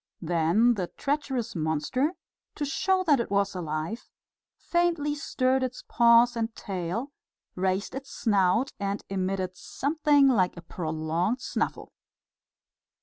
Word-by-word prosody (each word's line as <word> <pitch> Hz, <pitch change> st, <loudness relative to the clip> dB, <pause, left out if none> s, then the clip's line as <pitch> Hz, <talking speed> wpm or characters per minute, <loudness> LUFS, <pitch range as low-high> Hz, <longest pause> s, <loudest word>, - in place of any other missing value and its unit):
Then 175 Hz, +8 st, +3 dB
the 185 Hz, -5 st, -3 dB
treacherous 270 Hz, -6 st, -2 dB
monster, 160 Hz, -, 0 dB, 0.4 s
to 295 Hz, -, -2 dB
show 375 Hz, +6 st, +1 dB
that 295 Hz, -7 st, +4 dB
it 235 Hz, -, -2 dB
was 200 Hz, 0 st, +1 dB
alive, 165 Hz, +5 st, -4 dB, 0.5 s
faintly 340 Hz, -4 st, 0 dB
stirred 265 Hz, -3 st, 0 dB
its 255 Hz, -1 st, -3 dB
paws 235 Hz, +1 st, +5 dB
and 225 Hz, -1 st, -2 dB
tail, 195 Hz, +7 st, -4 dB, 0.4 s
raised 190 Hz, +2 st, -1 dB
its 270 Hz, +1 st, -7 dB
snout 210 Hz, +3 st, +2 dB
and 200 Hz, 0 st, -2 dB
emitted 190 Hz, -1 st, -2 dB
something 290 Hz, -, +2 dB
like 185 Hz, -9 st, +2 dB
a 170 Hz, -, -9 dB
prolonged 165 Hz, +6 st, -2 dB
snuffle. -, -, -3 dB
225 Hz, 120 wpm, -27 LUFS, 180-275 Hz, 0.5 s, paws